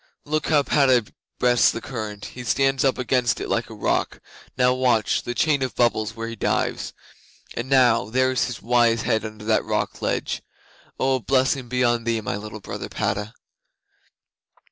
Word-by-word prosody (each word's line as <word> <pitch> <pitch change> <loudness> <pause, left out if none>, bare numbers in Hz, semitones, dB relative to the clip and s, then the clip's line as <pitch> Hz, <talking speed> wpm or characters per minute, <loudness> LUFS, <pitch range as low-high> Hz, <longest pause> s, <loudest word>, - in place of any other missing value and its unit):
Look 155 +1 -1
how 150 -2 +3
Padda 130 -6 +3 0.3
breasts 120 -1 +4
the - - -3
current! 110 -4 -6
He 125 - -7
stands 135 +2 +1
up 135 -1 +2
against 125 -1 +1
it - - -5
like - - -1
a - - -9
rock; - - -1 0.4
now 125 0 +4
watch 125 -4 +1
the 120 - -5
chain 150 -1 +2
of 130 -2 -2
bubbles 110 -2 +1
where 115 0 -5
he 115 - -6
dives; - - -1 0.6
and 120 +2 -5
now 125 -6 +4
there 130 +2 +2
is 130 - +1
his 125 - -6
wise 115 -1 +3
head 110 -3 +1
under 110 -1 -8
that 110 0 +2
rock - - -2
ledge! - - -2 0.6
Oh, 130 0 +2
a - - -6
blessing 130 0 +1
be 125 +1 0
on 120 -1 +2
thee, 115 -1 +1
my 105 - -3
little 105 +1 -7
brother - - -6
Padda!" 105 +2 -2
120 Hz, 180 wpm, -23 LUFS, 110-130 Hz, 0.6 s, breasts